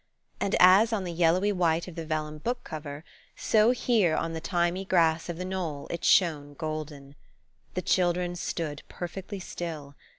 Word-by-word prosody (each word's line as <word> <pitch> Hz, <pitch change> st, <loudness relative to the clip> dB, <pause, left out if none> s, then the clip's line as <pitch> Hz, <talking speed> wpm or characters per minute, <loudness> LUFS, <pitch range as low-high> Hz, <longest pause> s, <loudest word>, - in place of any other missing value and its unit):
And 195 Hz, -, 0 dB
as 190 Hz, +5 st, +7 dB
on 215 Hz, -4 st, -1 dB
the 175 Hz, -2 st, -4 dB
yellowy 175 Hz, +4 st, +3 dB
white 170 Hz, -3 st, +1 dB
of 180 Hz, -, -8 dB
the 165 Hz, -1 st, -6 dB
vellum 155 Hz, -1 st, -3 dB
book 245 Hz, +8 st, -3 dB
cover, 150 Hz, -1 st, -7 dB, 0.3 s
so 215 Hz, +1 st, +3 dB
here 230 Hz, -9 st, +2 dB
on 165 Hz, -, -2 dB
the 160 Hz, -, -4 dB
thymy 175 Hz, +2 st, 0 dB
grass 165 Hz, -3 st, +2 dB
of 170 Hz, -, -4 dB
the 180 Hz, -, -4 dB
knoll 175 Hz, -7 st, -4 dB
it 170 Hz, -, -5 dB
shone 145 Hz, -5 st, +3 dB
golden. 150 Hz, -2 st, -6 dB, 0.6 s
The 185 Hz, -, -2 dB
children 175 Hz, 0 st, +1 dB
stood 160 Hz, -4 st, -4 dB
perfectly 190 Hz, +3 st, -6 dB
still. 160 Hz, -6 st, -6 dB
170 Hz, 165 wpm, -28 LUFS, 155-185 Hz, 0.6 s, as